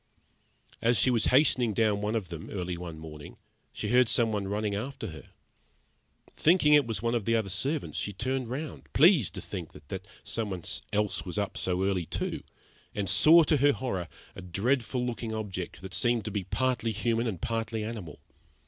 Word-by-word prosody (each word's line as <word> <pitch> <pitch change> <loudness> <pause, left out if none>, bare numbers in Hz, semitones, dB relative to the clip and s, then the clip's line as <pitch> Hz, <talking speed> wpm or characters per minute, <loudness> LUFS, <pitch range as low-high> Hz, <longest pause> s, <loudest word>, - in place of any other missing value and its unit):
As 115 0 +3
she 130 - +4
was 115 -3 +2
hastening 125 -5 +3
down 105 -3 +2
one 105 +2 -1
of 100 -6 -2
them, 85 -2 -7
early 90 -2 -3
one 85 -2 -7
morning, 75 -2 -10 0.3
she - - -4
heard 125 -1 +5
some 115 -2 +4
one 100 -2 -2
running 105 +1 -1
after 115 +2 -4
her. 80 -1 -11 1.1
Thinking 155 -2 +4
it 145 -4 +6
was 115 0 -3
one 115 0 +1
of 115 -4 -1
the 115 - +2
other 110 -4 0
servants, 140 - -2
she 105 - -2
turned 130 +4 -2
round, 145 +5 -6
pleased 155 - +5
to - - -5
think - - -7
that 95 +7 -8 0.2
some 110 -2 -3
one 90 -3 -5 0.3
else 105 -1 0
was 90 +1 -4
up 100 -1 -1
early 90 -1 0
too, - - -3 0.5
and 100 -1 -1
saw 155 - +7
to 155 0 +3
her 145 +1 +4
horror 95 -12 -3 0.3
a - - -8
dreadful 120 +7 0
looking 115 -2 -3
object, 95 -4 -5
that 95 -1 -7
seemed 115 +2 +1
to 110 - -3
be 100 -2 -3
partly 125 -1 0
human 115 +2 0
and 95 -7 -3
partly 115 0 -2
animal. 105 -9 -6
110 Hz, 185 wpm, -29 LUFS, 95-125 Hz, 1.1 s, saw